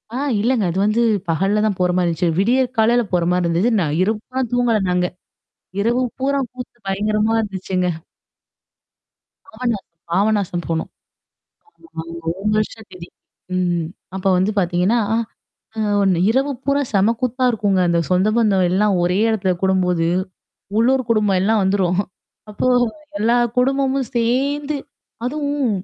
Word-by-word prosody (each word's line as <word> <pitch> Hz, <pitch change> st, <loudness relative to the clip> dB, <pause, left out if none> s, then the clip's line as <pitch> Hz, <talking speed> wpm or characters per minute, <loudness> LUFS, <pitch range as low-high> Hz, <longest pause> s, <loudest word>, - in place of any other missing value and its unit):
ஆ. -, -, -1 dB, 0.2 s
இல்லங்க. 235 Hz, -2 st, +1 dB
அது 185 Hz, -, -4 dB
வந்து 215 Hz, +3 st, +2 dB, 0.3 s
பகல்ல 195 Hz, +6 st, +1 dB
தான் 200 Hz, -3 st, 0 dB
போறமாரி 180 Hz, 0 st, +2 dB
இருந்துச்சு. 170 Hz, +1 st, 0 dB
விடியற்காலையில 240 Hz, +1 st, +2 dB
போறமாரி 175 Hz, 0 st, +1 dB
இருந்துச்சு. 175 Hz, +8 st, +1 dB
நான் 150 Hz, -2 st, -1 dB
இரவெல்லாம் 225 Hz, +5 st, -1 dB
தூங்கல 240 Hz, -3 st, +2 dB
நாங்க. 180 Hz, 0 st, +1 dB, 0.7 s
இரவு 240 Hz, +4 st, +1 dB, 0.2 s
பூராம் 270 Hz, -2 st, 0 dB
கூத்து, 250 Hz, -1 st, -9 dB
பயங்கரமா 210 Hz, +3 st, 0 dB
இருந்துச்சுங்க. 190 Hz, -3 st, -2 dB, 1.6 s
பாபநாசம் 240 Hz, -, -3 dB, 0.2 s
பாபநாசம் 195 Hz, -2 st, +1 dB
போணோம். 165 Hz, -1 st, -2 dB, 1.0 s
ஆமாங்க. 165 Hz, -, -7 dB, 0.2 s
1 195 Hz, +4 st, -3 dB
வருஷ 215 Hz, +1 st, 0 dB
திதி. 180 Hz, -2 st, -10 dB, 0.5 s
ம் 175 Hz, -2 st, 0 dB, 0.3 s
அப்ப 190 Hz, -, -6 dB
வந்து 190 Hz, +4 st, +1 dB
பார்த்தீங்கன்னா, 180 Hz, +6 st, +1 dB
அ, -, -, +3 dB, 0.6 s
அ -, -, -2 dB, 0.2 s
ஒண்ணு 185 Hz, -3 st, +2 dB
இரவு 270 Hz, +4 st, +1 dB
பூரா 280 Hz, +1 st, +1 dB
செம 205 Hz, +4 st, +3 dB
கூத்தா 255 Hz, +1 st, -1 dB
இருக்குங்க. 200 Hz, -4 st, +1 dB
அந்த 170 Hz, 0 st, +2 dB
சொந்த 185 Hz, +3 st, +3 dB
பந்தம் 200 Hz, -5 st, +3 dB
எல்லாம் 200 Hz, +1 st, +2 dB
ஒரே 180 Hz, +2 st, +1 dB
இடத்துல 190 Hz, -4 st, +1 dB
கூடும்போது. 180 Hz, -3 st, +2 dB, 0.7 s
உள்ளூர் 260 Hz, +3 st, +3 dB
குடும்பம் 210 Hz, -4 st, +2 dB
எல்லாம் 215 Hz, +1 st, +2 dB
வந்துரும். 190 Hz, -1 st, +1 dB, 0.5 s
அப்போ 210 Hz, +4 st, -2 dB, 0.5 s
எல்லா 230 Hz, +3 st, +3 dB, 0.2 s
குடும்பமும் 270 Hz, -1 st, +1 dB
சேர்ந்து 280 Hz, +5 st, 0 dB, 0.5 s
அதுவும் 285 Hz, -2 st, -1 dB
210 Hz, 130 wpm, -20 LUFS, 185-245 Hz, 1.6 s, அ